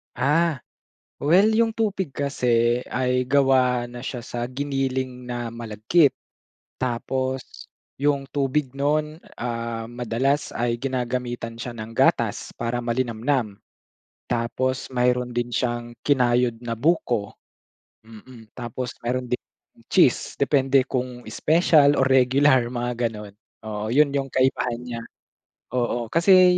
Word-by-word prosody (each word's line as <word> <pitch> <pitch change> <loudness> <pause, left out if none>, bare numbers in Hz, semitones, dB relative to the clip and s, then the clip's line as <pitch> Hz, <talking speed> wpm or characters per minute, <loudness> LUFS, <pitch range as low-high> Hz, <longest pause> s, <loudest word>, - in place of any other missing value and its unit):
Ah, 150 +2 +2 0.6
well 180 +9 +4
'yong 225 0 +2
tupig 195 -9 -1
kasi 125 -3 +1
ay 125 0 +1
gawa 130 -2 +3
na 120 +1 -9
siya 125 -3 -4
sa 120 0 -4
giniling 130 -1 -3
na 120 -1 -4
malagkit. 115 +7 +2 0.7
Tapos, 130 +1 -3 0.3
'yong 140 -1 0
tubig 140 0 0
no'n, 150 +2 0 0.2
ah, 115 -1 -3
madalas 125 +4 -1
ay 120 0 -1
ginagamitan 120 -2 -3
siya 120 0 -6
ng 110 0 -8
gatas - - +2
para 120 +1 -2
malinamnam. 120 -2 -1 0.7
Tapos, 125 +3 -1
mayroon 125 0 +1
din 120 0 -1
siyang 120 -1 -2
kinayod 125 -4 +2
na 115 -1 -4
buko, 120 -6 0 0.6
mm. 115 0 -14
Tapos, 125 +1 -4 0.2
mayro'n 125 0 -2
din 125 - +1 0.5
cheese - - +3
depende 135 -1 +3
kung 125 -1 -3
special 155 -3 +4
o 135 - +2
regular, 130 0 +4
mga 120 -1 -2
gano'n. 105 -3 -7 0.3
Oo, 110 +2 -3
'yon 150 -1 +5
'yong 140 -1 -1
kaibahan 130 -2 0
niya, 120 -2 -5 0.8
oo 120 -1 -1
kasi 180 +1 +6
125 Hz, 115 wpm, -24 LUFS, 120-140 Hz, 0.8 s, kasi